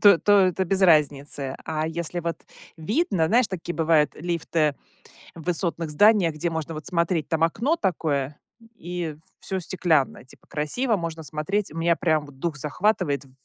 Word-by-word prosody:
то 200 -5 +7
то 205 - +2
это 185 0 +2
без 195 +2 0
разницы, 145 -5 +2
а 155 0 -2
если 170 +1 -4
вот 170 0 -3 0.4
видно 195 - 0
знаешь, 245 +1 +4
такие 175 -2 -5
бывают 160 -2 +3
лифты 165 -2 0 0.6
в 165 - -10
высотных 170 -2 -2
зданиях, 185 0 +4
где 170 +3 -2
можно 160 0 -4
вот 155 - -7
смотреть. 170 -3 0
Там 160 0 0
окно 240 - +2
такое, 150 - -1 0.4
и 175 -3 -5 0.2
всё 190 - -3
стеклянное, 165 -5 0
типа, 130 - -20
красиво, 215 - 0
можно 165 -2 -5
смотреть, 155 +8 -2
у 160 - -11
меня 170 0 +2
прям 155 -4 +1
дух 145 +3 -4
захватывает 150 0 0
в 135 - -19
165 Hz, 160 wpm, -24 LUFS, 155-185 Hz, 0.6 s, то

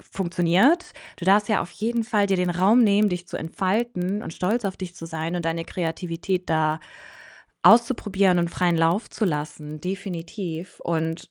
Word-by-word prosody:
funktioniert. 190 - +2 0.3
Du 175 - -7
darfst 200 +3 +4
ja 215 - +2
auf 175 - -9
jeden 230 +2 -1
Fall 215 -3 +1
dir 195 -1 +1
den 180 -1 0
Raum 195 +8 +4
nehmen, 210 -1 +4
dich 180 -1 -4
zu - - -5
entfalten 190 +3 -1
und 165 - -7
stolz 215 +5 -1
auf 190 - -2
dich 180 -2 -7
zu 165 - -8
sein 160 +1 -3
und 175 - -4
deine 165 0 -1
Kreativität 175 +1 -3
da 155 0 +1 0.8
auszuprobieren 205 -6 +4
und 170 0 -1
freien 175 -1 +1
Lauf 165 +6 +1
zu 220 - -2
lassen. 150 -2 -4
Definitiv. 180 -1 -6
Und 165 0 -3
180 Hz, 170 wpm, -24 LUFS, 165-205 Hz, 0.8 s, darfst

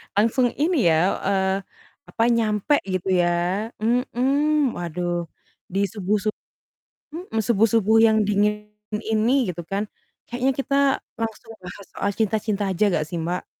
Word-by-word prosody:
langsung 230 +4 +2
ini 330 +4 +2
ya, 165 +4 +2
eee, 190 -1 +1 0.6
apa, 225 - 0
nyampe 225 +2 +2
gitu, 185 -1 -3
ya. 175 - +2 0.5
Mhm, 265 +5 +1
waduh 175 0 -3 0.5
di 195 - 0
subuh-sub 210 +1 -1 0.8
mhm, 335 - -5
subuh-subuh 225 -1 +3
yang 220 -1 +3
dingin 210 +1 +1 0.4
ini 220 +3 +2 0.2
gitu, 175 0 -6
kan, 195 +1 0 0.4
kayaknya 250 +2 0
kita 275 +1 -1 0.5
langsung 225 0 -5
bahas 185 +2 -10
soal 200 - -1
cinta-cinta 215 -1 0
aja 190 +3 +1
enggak 155 -3 0
sih, 175 - -3
Mbak? 175 +2 -3
215 Hz, 130 wpm, -23 LUFS, 190-235 Hz, 0.8 s, subuh-subuh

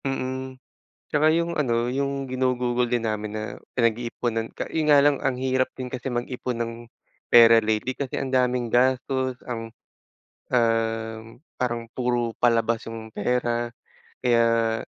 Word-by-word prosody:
Mm, 130 -1 -3 0.5
tsaka 150 +1 +3
yung 170 0 -1
ano, 120 -3 +1
yung 140 +1 -1
ginugugol 125 -1 0
din 120 -1 0
namin 105 -1 -3
na 110 - -3 0.3
pinag-iiponan 115 -1 0
ka - - -3
yun 160 -1 0
nga 145 -2 +6
lang, 145 -1 +3
ang 135 -2 0
hirap 130 0 +1
din 130 -1 -6
kasi 130 - -5
mag-ipon 125 0 -3
ng 115 0 -3 0.5
pera 115 -1 +8
lately, 110 +3 -1
kasi 130 0 -4
ang 135 - -3
daming 125 -2 +1
gastos 130 +1 +1
ang, 115 -2 -6 0.7
um, 115 -1 0 0.2
parang 120 -2 -1
puro 120 -2 0
palabas 115 -1 +2
yung 110 -1 -8
pera 120 +1 0 0.5
kaya 115 -2 +3
120 Hz, 135 wpm, -25 LUFS, 115-130 Hz, 0.7 s, pera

